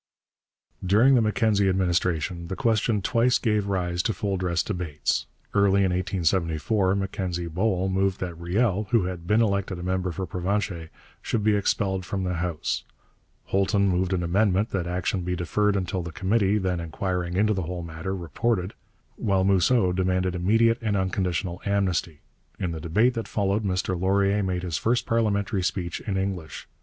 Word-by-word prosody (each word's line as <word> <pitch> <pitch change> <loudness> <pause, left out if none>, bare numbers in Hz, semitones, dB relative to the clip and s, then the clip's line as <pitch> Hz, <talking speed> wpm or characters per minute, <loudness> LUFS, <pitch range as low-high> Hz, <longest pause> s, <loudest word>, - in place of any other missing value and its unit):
During 110 +9 +5
the 125 - +5
Mackenzie 105 -2 +2
administration 85 -2 0
the 95 - -4
question 110 -2 +1
twice 120 +4 +3
gave 105 -4 0
rise 90 -3 -1
to 110 - -1
full 100 -2 -1
dress 90 -2 0
debates. 90 -8 -2 0.3
Early 100 -1 +4
in 95 -2 +2
1874 90 +1 +1
Mackenzie 95 -3 -2
Bowell 95 +2 0
moved 95 0 0
that 90 -2 -3
Riel, 100 +4 0
who 115 -5 +3
had 90 -2 -5
been 110 +3 +4
elected 100 -3 -1
a 85 - -7
member 90 0 -1
for 95 +3 -4
Provencher, 90 -1 -2 0.3
should 110 -3 -1
be 105 0 +3
expelled 95 -1 0
from 95 +1 -3
the 90 0 -1
House; 85 -3 -2 0.6
Holton 100 +1 +1
moved 90 0 0
an 90 -2 0
amendment 100 +4 +1
that 90 -3 -2
action 90 +2 -1
be 90 +1 -2
deferred 105 +4 +1
until 95 -1 -1
the 85 0 -6
committee, 100 +3 +1
then 95 -3 -1
inquiring 90 +1 -3
into 105 +3 +3
the 95 - -2
whole 90 0 -4
matter, 85 +3 -5
reported; 90 +3 -1 0.4
while 95 -2 +1
Mousseau 95 +1 +3
demanded 90 0 0
immediate 115 +6 +3
and 105 -3 0
unconditional 95 -1 -1
amnesty. 95 -6 -1 0.4
In 90 -3 -2
the 80 -1 -5
debate 105 +10 +2
that 115 -2 -4
followed 100 +1 0
Mr 95 -2 -1
Laurier 100 +3 +2
made 90 -2 -2
his 85 -3 -2
first 120 +2 +1
parliamentary 100 -3 0
speech 90 -2 -2
in 100 -3 -2
English. 95 -5 -4
95 Hz, 165 wpm, -25 LUFS, 90-100 Hz, 0.6 s, During